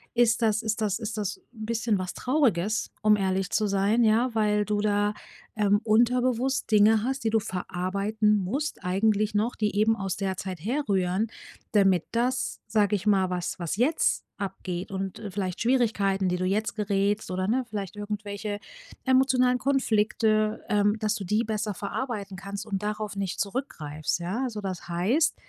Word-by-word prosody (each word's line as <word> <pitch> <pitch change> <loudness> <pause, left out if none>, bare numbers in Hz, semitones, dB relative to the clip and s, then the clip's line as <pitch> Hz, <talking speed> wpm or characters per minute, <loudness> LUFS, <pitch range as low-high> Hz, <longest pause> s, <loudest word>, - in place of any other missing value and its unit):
ist 235 -1 +3
das 220 -1 +2
ist 220 0 -1
das 210 -1 0
ist 220 -1 -4
das 205 -3 -2 0.2
'n 220 -2 -7
bisschen 225 -1 0
was 185 0 -4
Trauriges, 220 - +1
um 215 -1 +5
ehrlich 190 -1 0
zu 215 - +1
sein, 200 +4 +2
ja? 230 +3 +3
Weil 210 -1 +2
du 210 0 0
da, 205 0 +1 0.4
ähm, 205 -1 +3
unterbewusst 245 +3 +2
Dinge 215 +1 +5
hast, 265 +2 -2
die 225 - +2
du 225 - +4
verarbeiten 200 +3 0
musst. 270 +12 -3
Eigentlich 210 +3 +1
noch, 220 +4 +1
die 210 -2 -1
eben 215 +2 +3
aus 195 -3 -3
der 190 -2 -2
Zeit 185 -2 -5
herrühren, 205 -5 0 0.5
damit 195 -5 +4
das, 250 +2 -1
sage 210 -1 +2
ich 200 0 -4
mal 190 -3 +3
was 180 +1 -3
was 170 0 -2
jetzt 275 +8 +2 0.2
abgeht 185 -2 -4
und, 190 -1 -4
äh, 210 -3 -6
vielleicht 185 -2 -3
Schwierigkeiten, 210 -6 +2
die 180 - 0
du 185 - -1
jetzt 210 +4 0
gerätst, 205 -1 0
oder, 185 +1 -1
ne, 250 +4 +1
vielleicht 200 -3 -5
irgendwelche 205 0 -4 0.5
emotionalen 255 -1 +4
Konflikte, 215 -5 +1
ähm, 205 0 +3
dass 215 0 0
du 205 - -5
die 210 +5 +1
besser 215 -1 -2
verarbeiten 205 -2 -4
kannst 200 +2 -6
und 200 -1 -3
darauf 210 -1 -3
nicht 195 -2 -3
zurückgreifst, 170 - -2
ja? 180 +8 -2
Also, 225 -5 -3
das 185 -4 -5
heißt, 220 - +2
210 Hz, 170 wpm, -27 LUFS, 195-225 Hz, 0.5 s, um